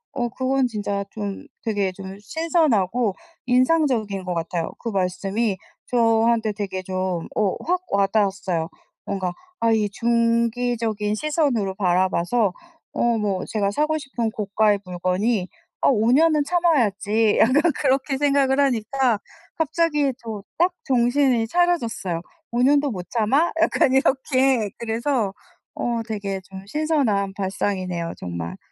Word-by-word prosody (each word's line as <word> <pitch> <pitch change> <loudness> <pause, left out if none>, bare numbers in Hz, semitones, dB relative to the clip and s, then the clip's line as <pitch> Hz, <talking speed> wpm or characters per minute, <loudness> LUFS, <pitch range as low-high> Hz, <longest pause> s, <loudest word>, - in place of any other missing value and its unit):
어 240 -3 -1
그건 260 +1 0
진짜 205 -3 -3
좀 205 +4 -5 0.2
되게 205 -4 0
좀 190 +1 -9
신선하고 245 - +1 0.3
인상적인 250 - +2
것 180 - -2
같아요. 165 0 -2
그 230 - -5
말씀이 195 +2 -1 0.3
저한테 225 -2 +2
되게 195 -2 -4
좀 185 -2 -2
어 205 -3 +1
확 360 +1 +1
와닿았어요. 195 -4 +1 0.4
뭔가 185 -2 -2 0.3
아 230 0 +2
이 215 -2 +2
중기적인 230 -1 0
시선으로 270 - 0
바라봐서 185 +2 +1 0.4
어 235 -1 +1
뭐 200 -3 -1
제가 205 -3 0
사고 305 +7 +1
싶은 255 -6 -3
고가의 210 0 +1
물건이 185 +3 0 0.3
'어 - - +4
5 230 -3 +3
년은 305 +2 +4
참아야지.' 225 - +2
약간 295 +8 +4
그렇게 270 0 +1
생각을 280 -1 +2
하니까 255 -2 +2 0.4
갑자기 305 -3 +1
저 215 -3 -7 0.2
딱 355 +1 +3
정신이 245 -2 +2
차려졌어요. 235 - 0 0.3
'5 240 - 0
년도 285 +1 +3
못 180 -3 -6
참아?' 260 +9 +2
약간 265 - +3
이렇게. 265 -4 +2
그래서 230 -2 -1 0.4
어 235 -1 -2
되게 200 -3 -3
좀 190 0 -9
신선한 260 -9 0
발상이네요 185 -3 -2
정말. 85 -1 -5
225 Hz, 265 characters per minute, -23 LUFS, 195-265 Hz, 0.4 s, 어